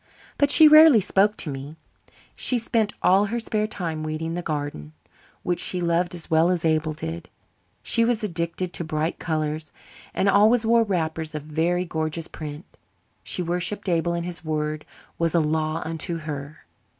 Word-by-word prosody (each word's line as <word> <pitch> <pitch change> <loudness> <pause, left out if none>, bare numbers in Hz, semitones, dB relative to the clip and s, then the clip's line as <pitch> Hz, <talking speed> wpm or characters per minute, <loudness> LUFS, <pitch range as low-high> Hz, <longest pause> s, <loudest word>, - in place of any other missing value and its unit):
But 285 - +4
she 310 +2 +8
rarely 305 -5 +8
spoke 205 +2 +2
to 155 - -2
me. 135 +3 -7 0.6
She 250 - 0
spent 225 -2 0
all 195 +3 +4
her 230 +4 -2
spare 215 -1 -1
time 165 -7 -4
weeding 155 +1 -4
the 175 - -3
garden, 145 - -5 0.5
which 175 -1 -1
she 180 - 0
loved 175 +1 0
as 170 - -8
well 160 +2 +3
as 175 -2 0
Abel 155 -1 +1
did. 85 - -7 0.5
She 230 - +3
was 230 -1 0
addicted 175 -1 -3
to - - -1
bright 155 +1 -2
colours 155 -1 -3 0.4
and 195 - 0
always 215 +4 +4
wore 230 +1 +4
wrappers 160 -5 -3
of 150 - -4
very 165 +4 0
gorgeous 160 -1 -3
print. 150 +1 -8 0.6
She 180 - -2
worshipped 180 +4 -2
Abel 170 -1 +1
and 170 0 -3
his 175 -1 -7
word 155 -1 -3 0.3
was 165 0 0
a - - +5
law 155 0 -1
unto 165 +1 -2
her. 150 -1 -7
170 Hz, 170 wpm, -24 LUFS, 155-190 Hz, 0.6 s, she